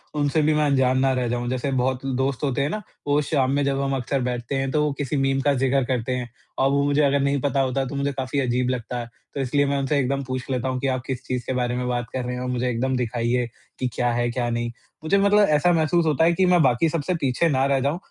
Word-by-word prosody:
उनसे 145 +1 +1
भी 155 +1 +3
मैं 150 0 +2
अंजान 130 -2 +2
ना 135 0 +3
रह 125 -1 -1
जाऊँ। 120 0 -2
जैसे 130 +2 -2
बहुत 130 0 -1
दोस्त 130 0 -1
होते 135 -1 0
हैं 140 - 0
ना? 215 +5 -3 0.3
वो 145 +1 +3
शाम 135 -3 +1
में 145 - +1
जब 140 0 0
हम 135 0 0
अक्सर 130 +1 -1
बैठते 125 +1 -3
हैं 135 0 -1
तो 150 +1 +2
वो 150 - +1
किसी 145 0 -2
मीम 135 0 +1
का 145 0 +2
जिक्र 135 +1 +1
करते 125 -1 -2
हैं। 125 -1 -4 0.3
और 135 - +3
वो 140 0 +2
मुझे 145 +1 +2
अगर 140 0 +3
नहीं 140 0 +1
पता 140 -1 0
होता 135 +1 0
है 135 - -2
तो 140 - -6
मुझे 140 0 0
काफ़ी 130 +1 -2
अजीब 125 -1 0
लगता 125 -1 -3
है। 120 - -6 0.2
तो 140 - -2
इसलिए 145 +2 +1
मैं 140 0 0
उनसे 140 +2 0
एकदम 140 +1 -1
पूछ 130 0 -4
लेता 130 0 -1
हूँ 130 -1 -2
कि 135 - -1
आप 130 -1 0
किस 130 -1 -4
चीज़ 125 -2 -2
के 130 - -2
बारे 125 -1 -1
में 125 0 -2
बात 120 -1 -1
कर 130 -1 -2
रहे 125 0 -3
हो 125 - -4
और 125 - -3
मुझे 125 0 -1
एकदम 130 +2 -1
दिखाइए 120 0 0 0.3
कि 130 - 0
क्या 120 -1 0
है? 120 0 0
क्या 120 -1 -1
नहीं। 120 0 -2 0.3
मुझे 195 +5 +2
मतलब 200 +1 +4
ऐसा 150 +4 +3
महसूस 165 +1 +2
होता 155 +1 +2
है 170 - +4
कि, 185 +2 +2
मैं 180 -2 +4
बाकी 130 +5 +3
सबसे 165 +3 -1
पीछे 140 +5 +1
ना 135 -1 +2
रह 140 -1 +2
जाऊँ 140 +5 0
135 Hz, 280 wpm, -23 LUFS, 125-145 Hz, 0.3 s, मतलब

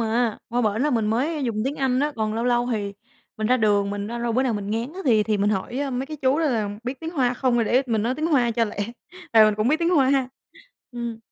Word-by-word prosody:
à, 230 0 0
qua 240 +1 0
bển 215 +3 0
là 300 - +2
mình 225 -4 +1
mới 275 +7 0
dùng 230 -4 -2
tiếng 280 +2 -2
Anh 260 -2 +1
á, 295 +1 0
còn 215 -1 -1
lâu 230 - -1
lâu 240 0 +2
thì 205 -2 -2 0.4
mình 215 0 -1
ra 255 +2 +4
đường 205 -3 +2
mình 205 0 -4
ra 235 +2 -5
lâu 235 -1 -1
bữa 255 +3 +2
nào 255 - 0
mình 205 0 -4
ngán 230 +7 -2
á 380 - -6
thì 225 -5 +4
thì 215 0 0
mình 205 +1 +1
hỏi, 215 +6 -2
ơ, 280 -1 -2
mấy 255 +2 -3
cái 310 - -7
chú 275 +1 +1
đó 330 - +1
là 225 -8 0
biết 255 +2 -5
tiếng 325 0 -4
Hoa 255 -6 +1
không 255 -1 +1
rồi 235 - +2
để 255 +5 +3
mình 225 -3 0
nói 240 +3 0
tiếng 310 +3 -2
Hoa 255 -7 +2
cho 230 0 +1
lẹ, 210 - -7 0.6
tại 220 -1 +8
mình 215 -1 +3
cũng 215 +3 0
biết 310 - +3
tiếng 340 +1 +1
Hoa, 270 -4 +3 0.6
ừm. 235 -2 -5
240 Hz, 285 wpm, -23 LUFS, 220-265 Hz, 0.6 s, tại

